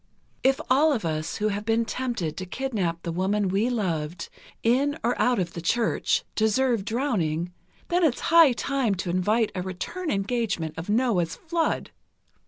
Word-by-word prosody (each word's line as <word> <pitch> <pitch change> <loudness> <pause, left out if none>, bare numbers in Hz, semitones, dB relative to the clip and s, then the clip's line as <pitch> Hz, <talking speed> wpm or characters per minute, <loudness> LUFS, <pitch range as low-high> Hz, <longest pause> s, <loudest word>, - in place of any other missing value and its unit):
If 265 0 +3
all 290 +5 +4
of 225 -9 -2
us 155 0 -2
who 215 +1 0
have 205 0 -3
been 225 +1 +1
tempted 235 -11 -3
to 185 - -5
kidnap 190 -8 -2
the 170 - -3
woman 190 +3 0
we 200 +6 +1
loved, 170 -8 -2 0.3
in, 275 +6 +2
or 240 +2 +1
out 245 -1 +3
of 175 -3 -2
the 170 - -5
Church, 230 +7 +1
deserve 225 0 +2
drowning, 180 - -1 0.4
then 355 +1 +2
it's 290 -7 +2
high 330 -5 +6
time 250 -4 0
to 180 -1 -3
invite 210 +5 +1
a 185 - -3
return 250 - -4
engagement 195 - -1
of 165 +4 -7
Noah's 205 -8 +1
flood. 330 -1 -1
215 Hz, 165 wpm, -26 LUFS, 180-255 Hz, 0.4 s, high